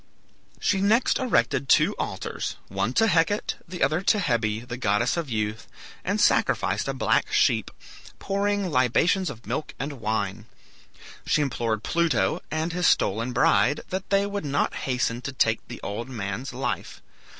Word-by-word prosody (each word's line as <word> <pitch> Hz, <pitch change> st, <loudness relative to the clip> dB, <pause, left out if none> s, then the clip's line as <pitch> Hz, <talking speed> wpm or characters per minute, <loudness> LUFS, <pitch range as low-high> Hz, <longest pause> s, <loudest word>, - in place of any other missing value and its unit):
She 195 Hz, -1 st, +1 dB
next 220 Hz, +5 st, +3 dB
erected 140 Hz, -, +1 dB
two -, -, +5 dB
altars, -, -, -4 dB
the -, -, -15 dB
one 100 Hz, +5 st, 0 dB
to 225 Hz, -, +4 dB
Hecate, 180 Hz, +1 st, +1 dB
the 180 Hz, 0 st, -3 dB
other 155 Hz, +6 st, +2 dB
to 210 Hz, +2 st, +3 dB
Hebe, 120 Hz, -, 0 dB
the 120 Hz, -, -4 dB
goddess 115 Hz, 0 st, +1 dB
of 170 Hz, -5 st, -3 dB
youth, 110 Hz, -1 st, -2 dB, 0.4 s
and 200 Hz, +3 st, -1 dB
sacrificed -, -, +2 dB
a -, -, -1 dB
black -, -, +1 dB
sheep, -, -, +2 dB, 0.5 s
pouring 200 Hz, -1 st, -1 dB
libations 155 Hz, -, +2 dB
of 115 Hz, -5 st, -10 dB
milk 125 Hz, +7 st, -4 dB
and 140 Hz, -2 st, -5 dB
wine. 105 Hz, 0 st, -2 dB, 0.8 s
She 150 Hz, -, +3 dB
implored 115 Hz, -5 st, -2 dB
Pluto 160 Hz, -, +1 dB
and 160 Hz, +2 st, -2 dB
his 180 Hz, -1 st, +2 dB
stolen 115 Hz, +5 st, +2 dB
bride 145 Hz, +4 st, +3 dB
that 190 Hz, +1 st, -4 dB
they 200 Hz, 0 st, +3 dB
would 200 Hz, 0 st, -3 dB
not 145 Hz, -1 st, 0 dB
hasten 125 Hz, -2 st, -1 dB
to 135 Hz, -, -4 dB
take 115 Hz, -3 st, 0 dB
the -, -, -8 dB
old 115 Hz, +5 st, -4 dB
man's 110 Hz, +1 st, -4 dB
life. 130 Hz, +3 st, -4 dB
135 Hz, 160 wpm, -25 LUFS, 115-180 Hz, 0.8 s, two